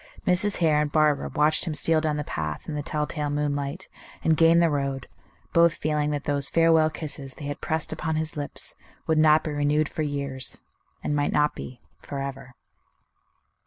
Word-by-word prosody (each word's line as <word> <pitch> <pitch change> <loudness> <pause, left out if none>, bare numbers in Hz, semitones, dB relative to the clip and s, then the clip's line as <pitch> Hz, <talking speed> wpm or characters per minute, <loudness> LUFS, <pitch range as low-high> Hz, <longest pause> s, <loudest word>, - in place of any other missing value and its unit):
Mrs. 185 +3 +2
Hare 155 -3 +3
and 150 -1 -1
Barbara 150 -2 +2
watched 150 +4 +3
him 155 - -2
steal 160 +1 +2
down 155 -1 0
the 150 - -2
path 75 - -4
in 155 - -4
the 150 - -2
telltale 150 0 -2
moonlight, 145 +3 -2 0.4
and 160 - +3
gain 165 +1 +5
the 170 -2 +4
road, 140 -2 -2 0.5
both 170 -1 +5
feeling 150 -1 -1
that 145 -1 -2
those 140 -1 0
farewell 165 -1 +4
kisses 150 -4 -4
they 145 - -8
had 145 0 -5
pressed 160 -1 -1
upon 160 0 -2
his 155 0 -2
lips 145 -1 -4 0.3
would 160 -1 +2
not 155 0 +5
be 155 - -3
renewed 145 +1 +1
for - - -4
years, 140 -3 -3 0.4
and 145 - -1
might 145 0 +1
not 150 0 +2
be 125 - -9 0.2
forever. 135 -2 -6
150 Hz, 180 wpm, -25 LUFS, 145-155 Hz, 0.5 s, gain